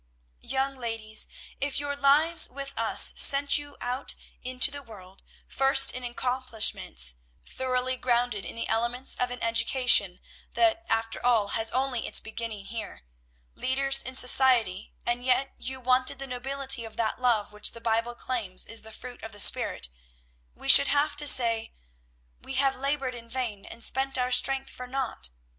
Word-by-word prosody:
"Young 270 0 -3
ladies, 225 -3 -1 0.3
if 285 0 -2
your 285 0 -4
lives 300 +4 +4
with 275 +2 -8
us - - +5
sent 280 +1 +5
you 290 0 -12
out 250 +2 -4 0.3
into 255 +3 0
the 285 0 -8
world, 195 -6 -15 0.3
first 270 0 +4
in 255 - -8
accomplishments, 240 - 0 0.3
thoroughly 255 0 -2
grounded 240 -4 -1
in - - -6
the 230 - -3
elements 235 +3 -2
of 250 - -1
an 245 0 -7
education, 230 -4 +2 0.3
that 340 -1 +1
after 225 0 -2
all 230 -4 +2
has 225 +1 -1
only 255 -1 -1
its - - +1
beginning 220 -2 -6
here, 220 - -7 0.5
leaders 270 +1 +2
in 260 - -6
society, 250 -7 +3
and 240 +1 -2
yet 260 +2 0
you 260 +1 -5
wanted 255 +2 +1
the 275 - -7
nobility 265 0 -2
of 225 -1 -11
that 230 +2 -2
love 230 -5 +1
which 210 - -2
the 230 - -11
Bible 230 +1 -2
claims 225 -8 -3
is 225 - -5
the 220 - -12
fruit 245 +3 -11
of 225 -1 -10
the 205 - -11
spirit, 65 - +4 0.7
we - - -10
should 140 - +8
have 290 +1 0
to 295 0 +1
say, 230 -5 +3 0.7
we 265 - -7
have 270 0 +1
'labored 275 -1 -3
in 235 -1 -12
vain, 230 -6 -5
and 235 - -9
spent 270 +1 0
our 250 0 -1
strength 270 +1 +3
for 250 - -10
naught.' 250 - -4
250 Hz, 165 wpm, -26 LUFS, 225-270 Hz, 0.7 s, should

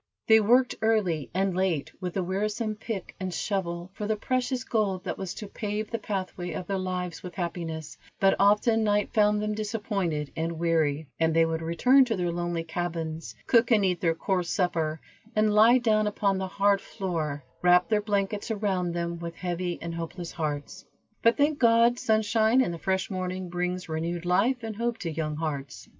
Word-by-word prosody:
They 220 0 +7
worked 245 +4 +4
early 200 -10 +1
and 190 +1 0
late, 180 -6 0
with 180 -2 -4
the 190 - 0
wearisome 210 +4 -1
pick 215 -3 -6
and 185 -1 -3
shovel 175 -2 -3
for 210 +1 -4
the 220 - +1
precious 255 +2 -1
gold 200 -6 0
that - - -4
was 190 -2 -4
to 210 - -7
pave 210 +1 -4
the 230 - -2
pathway 185 -3 -4
of 185 - -4
their 195 +1 -2
lives 180 -2 -3
with 180 -1 -8
happiness, 165 -3 -4 0.2
but 195 0 +4
often 210 +3 +4
night 210 -1 +1
found 210 -1 +3
them 210 0 -1
disappointed 205 -8 -2
and 165 0 -2
weary, 160 -3 +1
and 160 0 +2
they 165 0 +5
would 165 0 -2
return 250 +12 +4
to 230 -3 -1
their 175 -2 -1
lonely 175 -1 -2
cabins, 165 -1 -4
cook 235 -1 +4
and 215 -5 +4
eat 180 -2 0
their 165 -2 +2
coarse 180 +1 -1
supper, 165 -4 0 0.4
and 215 0 +3
lie 225 +4 +7
down 215 -3 +2
upon 200 -2 0
the 190 - -2
hard 200 +1 +2
floor, 155 -7 -3 0.2
wrap 180 0 +5
their 215 -1 +2
blankets 205 +1 -1
around 195 -5 -1
them, 170 0 -3
with 170 0 -6
heavy 175 -1 -3
and 170 0 -4
hopeless 170 +1 -5
hearts. 145 -3 -4 0.4
But 230 +1 +4
thank 295 0 +2
God, 235 0 +4
sunshine 220 +2 +3
and 210 -9 0
the 170 - -7
fresh 190 +3 -1
morning 185 -1 -3
brings 180 +1 -2
renewed 165 +2 -3
life 235 +8 +2
and 220 -2 -5
hope 235 0 -1
to 170 -6 -4
young 155 -1 -3
hearts. 145 -4 -5
185 Hz, 185 wpm, -27 LUFS, 170-215 Hz, 0.4 s, They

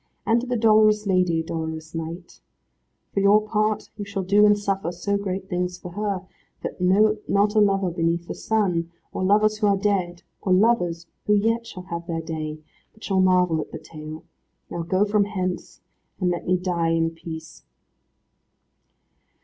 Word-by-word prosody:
And 230 +1 +3
to 250 - -6
the 250 0 0
dolorous 215 -1 +4
lady, 180 -4 +2
dolorous 160 -1 -5
knight. 165 +2 -7 0.7
For - - +1
your 200 +2 +6
part 215 0 -1
you 205 - -4
shall 200 -1 -4
do 205 +3 +5
and 205 0 +5
suffer 195 -4 -1
so 180 +4 -2
great 195 -1 -3
things 180 -1 -2
for 180 0 -9
her, 200 -1 -2 0.4
that - - -5
not 205 +2 +3
a 215 - +4
lover 195 -3 +3
beneath 170 0 -1
the - - -4
sun, 180 -7 0 0.2
or - - -2
lovers 215 +2 +3
who 210 - +3
are 200 -1 +3
dead, 190 -4 -1 0.2
or 185 - +2
lovers 185 -5 +2 0.2
who 210 - +5
yet 230 +3 +1
shall 185 -5 -8
have 170 -2 -6
their 165 -1 -2
day, 155 -2 -4 0.4
but 220 - -18
shall 190 -2 +1
marvel 180 -3 +3
at - - -9
the - - -5
tale. 155 0 -9 0.5
Now, 170 - -3
go 185 +4 +1
from 205 -1 +2
hence, 185 -3 -4 0.4
and 180 -2 +1
let 175 - -4
me 185 +1 +3
die 175 -2 0
in 165 0 +1
peace." 165 -1 -9
185 Hz, 175 wpm, -24 LUFS, 170-210 Hz, 0.7 s, your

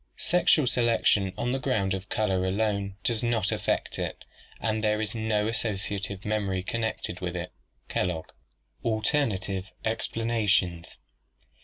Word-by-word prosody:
"Sexual 175 -4 +4
selection 115 -5 +3
on 120 - 0
the 135 - 0
ground 100 -6 +1
of 95 0 -5
colour 95 -4 +1
alone 100 0 0
does 115 -3 +1
not 120 -2 +1
affect - - -1
it, - - -4 0.3
and 110 -1 0
there 105 0 +2
is 110 -1 -1
no 110 -2 +1
associative 100 -3 -2
memory 100 -3 0
connected 110 -4 -2
with 90 -1 -3
it" 90 0 -4 0.4
(Kellogg). 90 -3 -1 0.5
Alternative 110 -5 0 0.2
Explanations. 110 -6 0
105 Hz, 125 wpm, -28 LUFS, 95-115 Hz, 0.5 s, Sexual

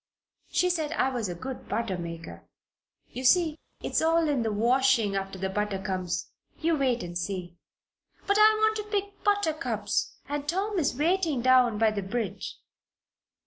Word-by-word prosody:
She 360 0 +2
said 320 -3 -1
I 265 - +2
was 240 -6 -2
a 175 - -4
good 260 +9 -7
butter 225 -4 -1
maker. 165 - -7 0.6
You 255 - -6
see, 320 +3 +4 0.2
it's - - 0
all 325 0 +3
in 285 -4 +1
the 225 -1 0
washing 235 -1 +3
after 195 0 -3
the 190 +1 -2
butter 210 +1 -1
comes. 185 -2 -3 0.3
You 330 0 +2
wait 255 -4 +1
and 175 0 -7
see." 175 -1 -4 0.7
"But 405 +1 +2
I 430 +1 +8
want 435 0 +3
to 425 - -3
pick 405 -1 -3
buttercups 405 -6 0
and 290 0 -3
Tom 390 +3 0
is 280 -5 0
waiting 320 -4 +1
down 255 -4 +5
by 220 0 +3
the 205 -1 -2
bridge." 205 0 -4
255 Hz, 165 wpm, -28 LUFS, 195-330 Hz, 0.7 s, I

